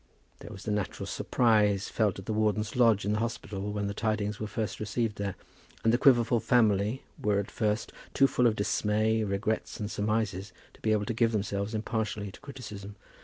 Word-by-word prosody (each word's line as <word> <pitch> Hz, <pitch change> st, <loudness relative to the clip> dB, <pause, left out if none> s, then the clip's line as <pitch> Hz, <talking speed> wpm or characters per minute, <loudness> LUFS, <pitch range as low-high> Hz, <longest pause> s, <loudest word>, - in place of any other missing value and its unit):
There -, -, -10 dB
was 100 Hz, -3 st, -9 dB
the 105 Hz, -, -2 dB
natural 105 Hz, -2 st, -2 dB
surprise 105 Hz, -5 st, +2 dB
felt 105 Hz, -5 st, 0 dB
at 95 Hz, -, -8 dB
the 110 Hz, -, -2 dB
Warden's 105 Hz, 0 st, 0 dB
lodge 115 Hz, -5 st, +4 dB
in 105 Hz, -, +1 dB
the 105 Hz, -, 0 dB
Hospital 105 Hz, -3 st, -3 dB
when 105 Hz, 0 st, -2 dB
the 100 Hz, -, -2 dB
tidings 105 Hz, -1 st, -1 dB
were 110 Hz, -, -3 dB
first 110 Hz, 0 st, -3 dB
received 105 Hz, 0 st, -1 dB
there, 100 Hz, -1 st, -3 dB, 0.5 s
and 115 Hz, -, +4 dB
the 120 Hz, -, +3 dB
Quiverful 120 Hz, -3 st, +5 dB
family 110 Hz, 0 st, +2 dB, 0.2 s
was 105 Hz, -1 st, +2 dB
at 100 Hz, -, -2 dB
first 105 Hz, 0 st, -1 dB, 0.2 s
too 135 Hz, -, +6 dB
full 125 Hz, -2 st, +3 dB
of 110 Hz, -, +2 dB
dismay, 110 Hz, +2 st, +1 dB
regrets 105 Hz, +2 st, -2 dB
and 105 Hz, 0 st, -3 dB
surmises, 105 Hz, -2 st, -1 dB, 0.2 s
to -, -, -21 dB
be 110 Hz, -, +1 dB
able 105 Hz, -1 st, +2 dB
to 115 Hz, -, -2 dB
give 115 Hz, 0 st, +2 dB
themselves 100 Hz, +1 st, -2 dB
impartially 110 Hz, -2 st, -2 dB
to -, -, -14 dB
criticism. 105 Hz, -7 st, -8 dB
105 Hz, 195 wpm, -29 LUFS, 100-115 Hz, 0.5 s, too